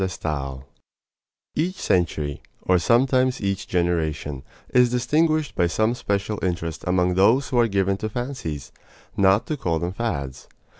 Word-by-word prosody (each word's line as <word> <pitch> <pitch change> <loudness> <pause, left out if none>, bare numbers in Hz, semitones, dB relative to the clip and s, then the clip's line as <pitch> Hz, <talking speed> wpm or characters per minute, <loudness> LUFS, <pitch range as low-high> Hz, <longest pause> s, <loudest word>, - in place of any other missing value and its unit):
DE 95 - +2
STAEL 70 -6 -4 0.9
Each 175 +5 -1
century, 80 - 0 0.2
or 90 -1 +3
sometimes 130 +5 +3
each 100 -2 -2
generation, 80 -5 -1 0.3
is 125 -1 +5
distinguished 150 +5 +1
by 85 - +2
some 110 +6 +1
especial 105 -4 -2
interest 85 -3 -2
among 90 0 +2
those 110 +9 +3
who 125 - +1
are 120 - +4
given 100 -1 +1
to 110 +2 -3
fancies 105 - -5 0.4
not 95 +1 +4
to 155 - -3
call 85 -11 0
them 85 +3 -3
fads. 70 - -4
95 Hz, 145 wpm, -23 LUFS, 85-120 Hz, 0.9 s, is